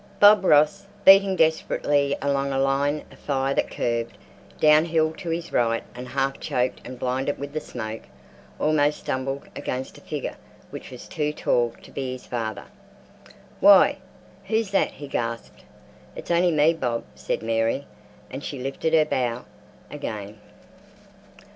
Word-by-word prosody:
Bob 205 -1 +7
Ross, 155 +3 +4 0.2
beating 195 0 +7
desperately 145 -3 +1
along 140 -1 0
a 135 - -1
line 140 +2 +1
of - - -16
fire 135 -1 -1
that - - 0
curved 115 -1 -2 0.4
down 155 +1 +6
hill 160 -1 +1
to 170 - -7
his 170 +1 -3
right, 115 -1 +1
and 125 +1 -8
half 135 +1 -1
choked 125 +1 -1
and 125 0 -8
blinded 130 +3 -1
with 140 +1 -7
the 155 - -1
smoke, 110 -6 -6 0.6
almost 150 -1 +2
stumbled 135 +1 -3
against 130 +1 -5
a - - -21
figure - - -5 0.4
which - - -8
was - - -10
too 150 -1 -1
tall 120 -5 0
to - - -14
be 130 -2 -4
his 130 - -10
father. 110 -3 -4 0.9
"Why! 200 -1 +6 0.5
who's 220 -2 0
that?" 195 - +1
he 145 - -9
gasped. 115 -3 -4 0.5
"It's - - -6
only 175 +1 +4
me, 155 +1 +4
Bob," 120 -7 -2
said - - -3
Mary, 115 +4 0 0.5
and 140 - -6
she 140 - -5
lifted 135 +5 -1
her 155 -1 +5
bough 125 -4 -2 0.5
again. 105 0 -6
140 Hz, 150 wpm, -24 LUFS, 125-155 Hz, 0.9 s, Bob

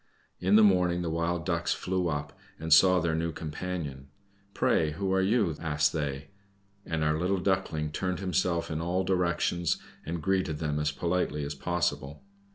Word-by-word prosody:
In 95 +3 +3
the 110 - +7
morning 90 -3 +3
the 85 - -2
Wild 85 +1 -1
Ducks 85 -2 0
flew 95 -1 -1
up, 75 -2 -3 0.2
and 80 0 +2
saw 90 +3 +6
their 85 -1 0
new 80 +1 -1
companion. 75 -3 -5 0.5
"Pray 75 -2 +2
who 95 +3 -1
are 95 - +3
you?" 100 -4 +2
asked 75 -3 +1
they; 70 -1 -3 0.6
and 80 -2 -1
our 75 0 +1
little 95 +3 +1
Duckling 90 -5 -1
turned 90 +3 -2
himself 90 -2 0
in 80 +1 -2
all 90 +3 0
directions, 85 -2 +1 0.3
and 85 +2 -4
greeted 95 -3 0
them 75 -1 -2
as 75 0 0
politely 85 -1 -1
as 70 - -4
possible. 75 -1 -2
85 Hz, 165 wpm, -29 LUFS, 75-90 Hz, 0.6 s, the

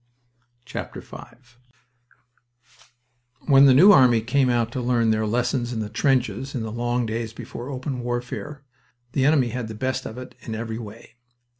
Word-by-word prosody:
V 125 - -6 2.7
When 140 -1 +6
the 130 - +7
New 185 +9 +8
Army 125 - +6
first 110 - -10
came 135 0 +3
out 120 -2 +1
to 130 - -3
learn 120 -2 +2
their 110 0 0
lessons 120 +2 -1
in 115 - -3
the 105 -1 -4
trenches 135 +2 0
in 120 - -2
the 110 - -5
long 120 +1 -1
days 115 0 -4
before 120 +2 -8
open 130 -1 -4
warfare, 125 +3 -5 0.5
the 135 0 +1
enemy 140 -4 +3
had 120 -1 -4
the 110 - -7
best 130 +4 -2
of 110 - -9
it 125 0 -9
in 110 - -6
every 110 0 -5
way. 115 +2 -11
120 Hz, 165 wpm, -23 LUFS, 115-130 Hz, 2.7 s, New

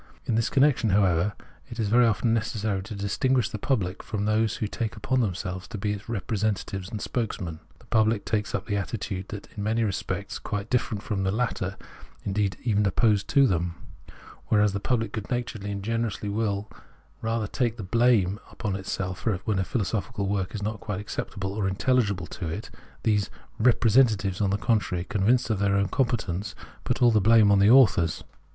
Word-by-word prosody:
In - - 0
this 115 +1 +1
connection, 130 -4 +3
however, 95 -1 +3 0.4
it 115 - -8
is 105 -3 0
very 120 +2 +5
often 115 +1 +1
necessary 110 -3 -1
to 105 +3 -7
distinguish 120 +5 +1
the 105 - -5
public 100 -7 -1
from 105 -2 -3
those 110 0 +2
who 110 - -1
take 110 +1 -3
upon 130 -1 0
themselves 95 -3 -3
to 115 - -6
be 105 +1 -1
its 105 +2 -8
representatives 100 -3 -2
and 110 - -5
spokesmen. 95 -9 -3 0.2
The - - -21
pubhc 110 -2 +2
takes 105 -2 -1
up 100 +1 -4
an 100 -2 0
attitude 100 -1 -4 0.2
in 100 - -4
many 110 +2 +1
respects 100 -1 -3
quite 105 0 -4
difierent 115 -4 0
from 105 -3 -2
the 95 0 +1
latter, 105 -4 -2 0.5
indeed, 100 -1 0
even 105 -3 +2
opposed 105 0 +2
to 140 -2 +5
them. 85 -6 0 0.7
Whereas 105 -2 +3
the 100 - -1
pubhc 115 +1 0
good 105 -2 -5
naturedly 115 -4 -3
and 100 -1 -4
generously 115 -1 -2
will 105 -1 -1 0.5
rather 115 0 -1
take 120 +2 -1
the 110 - -5
blame 110 -2 +3
upon 105 -4 -3
itself 95 0 -4 0.2
when 105 -4 +1
a - - +2
philosophical 105 -1 -2
work 95 0 -1
is 105 - -4
not 110 +1 -3
quite 100 -2 -4
acceptable 100 -2 -4
or 100 -2 0
intelhgible 100 -3 +1
to 90 - -5
it, 100 +7 -5 0.3
these 105 -3 +2 0.2
" - - -31
re 125 +3 +6
presentatives," 110 -5 +3
on 100 - +2
the 100 - +1
contrary, 105 -5 0
convinced 115 +5 +1
of 105 - 0
their 100 -1 +2
own 100 0 +1
competence, 110 -7 -1 0.3
put - - 0
all 120 - +7
the 110 -2 +3
blame 110 0 +6
on 100 - +5
the 100 +2 +5
authors. 100 -10 +5
105 Hz, 185 wpm, -26 LUFS, 100-115 Hz, 0.7 s, all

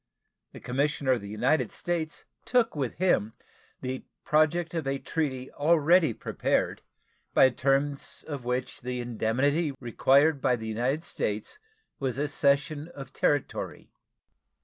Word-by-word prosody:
The - - -10
commissioner 140 +1 0
of 125 -4 +2
the 100 - -8
United 125 +4 +1
States 165 -2 -3 0.2
took 240 -6 +2
with 135 -5 -2
him 110 - +2 0.5
the 130 0 -4 0.2
project 160 +3 +2
of 160 -4 -2
a 135 0 0
treaty 135 -3 -3
already 160 +1 +4
prepared, - - -1 0.5
by 130 - +7
the 125 - -12
terms 140 +1 0
of 145 -5 -5
which 125 +1 -3
the 125 0 -3
indemnity 130 +6 0
required 135 +4 +3
by 125 - +3
the 110 -2 -7
United 125 +8 -1
States 105 - -3 0.4
was 130 -2 -2
a 145 +1 0
cession 145 +2 +1
of 135 -1 -9
territory. 145 -2 -1
140 Hz, 135 wpm, -28 LUFS, 125-155 Hz, 0.5 s, by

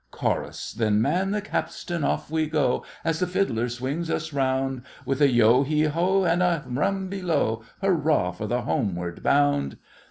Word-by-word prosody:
CHORUS. - - -3
Then 110 -2 +1
man 185 - +1
the 210 +1 -1
capstan—off 175 -6 -2
we 160 -1 +1
go, 150 -5 +1 0.2
As 165 -1 0
the 180 - +1
fiddler 125 - 0
swings 135 +8 -3
us 160 -1 -2
round, 135 -1 0 0.2
With 135 +2 -1
a 145 - +6
yeo 120 +1 +5
heave 150 +2 +1
ho, 185 +5 +2
And 175 0 +2
a 175 -4 +2
rum 190 +9 -1
below, 170 - -1 0.2
Hurrah 155 - +2
for 105 +4 -6
the 120 +2 -1
homeward 90 -7 -2
bound! 145 0 +2
145 Hz, 160 wpm, -25 LUFS, 125-170 Hz, 0.2 s, a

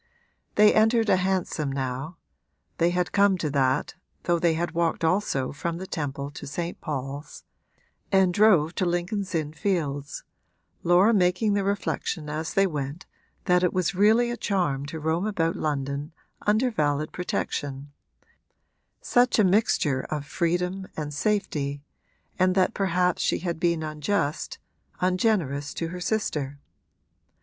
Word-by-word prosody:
They 210 0 +6
entered 225 0 +3
a 185 - +5
hansom 185 -6 -1
now 135 +4 -4 0.6
(they 170 +1 +4
had 180 0 +1
to - - -14
come 200 -1 +4
to 155 -4 -2
that, 135 0 +1 0.3
though 175 -1 +1
they 165 -1 +2
had 170 +2 -1
walked 170 -1 0
also 160 -7 +1
from 165 +3 -3
the 185 - -6
Temple 140 -4 -4
to 145 - -9
St. 170 +5 -4
Paul's) 140 0 -5 0.7
and 190 -2 +4
drove 180 -6 +4
to 185 - +1
Lincoln's 180 +2 -2
Inn 155 -2 -2
Fields, 150 -5 -2 0.6
Laura 180 +6 +5
making 190 +2 +2
the 200 -1 +1
reflection 190 -5 -2
as 160 +2 -4
they 195 - +5
went 150 -1 -4 0.4
that 180 -1 +4
it 180 - +2
was 185 0 0
really 220 +5 +4
a 240 - -4
charm 160 -11 -1
to 160 +2 -6
roam 160 +6 0
about 165 -6 0
London 145 0 -3 0.3
under 220 +5 +3
valid 150 -5 0
protection 145 -5 -3 1.1
such 245 0 +3
a 215 - +5
mixture 180 -9 +2
of 150 -2 -3
freedom 180 +5 -1
and 150 -1 -4
safety 145 -7 -1 0.6
and 185 0 +3
that 190 +3 +3
perhaps 180 -2 +1
she - - +1
had 170 -2 -3
been 170 -2 +1
unjust, 155 +1 -2 0.4
ungenerous 180 - 0
to 165 - -3
her 180 +1 -6
sister. 150 -10 -2
170 Hz, 145 wpm, -26 LUFS, 145-190 Hz, 1.1 s, They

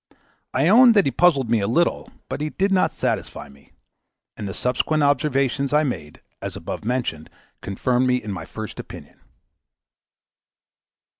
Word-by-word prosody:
I 135 +4 +1
owned 235 +4 +7
that 200 - +5
he 135 - +1
puzzled 145 -8 +3
me 115 - +3
a 100 - -1
little, 170 +10 0 0.2
but - - -5
he 155 - -1
did 195 +5 -1
not 185 -1 +2
satisfy - - -3
me; 70 0 -21 0.6
and 105 - -6
the 95 - -5
subsequent 145 +5 0
observations 140 -1 +1
I 150 +1 +4
made, 80 - -5 0.2
as - - -5
above - - -6
mentioned, 115 -10 -3 0.3
confirmed 125 +6 0
me 125 - +3
in 110 -5 -4
my 90 -4 -6
first 110 +4 -8
opinion. - - -11
130 Hz, 155 wpm, -22 LUFS, 110-155 Hz, 0.6 s, owned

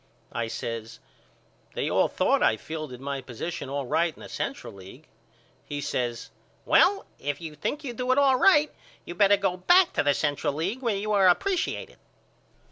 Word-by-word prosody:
I 115 -1 -2
says 115 0 -6 0.8
They - - -1
all - - +3
thought - - +1
I 110 - +3
fielded 155 -2 -7
my 140 0 -4
position 130 +5 -6
all 140 0 -3
right 165 +5 0
in - - -12
the - - -10
Central - - -5
League. 100 +10 -13 0.6
He 145 -1 -5
says 120 -4 -3 0.3
Well 395 +1 +4
if 145 0 -3
you 160 -2 -7
think 220 - -4
you 250 -4 -5
do 250 +2 -1
it 255 - +3
all 275 -2 +4
right 300 0 +4 0.3
you 175 - -6
better 200 +2 +4
go 190 -2 -1
back 355 - +4
to - - +1
the 145 -1 +2
Central 145 -2 -1
League 185 - -3
where 230 -5 0
you 210 +2 -3
are 200 -2 +4
appresiated. 360 - 0
160 Hz, 180 wpm, -26 LUFS, -, 0.8 s, Well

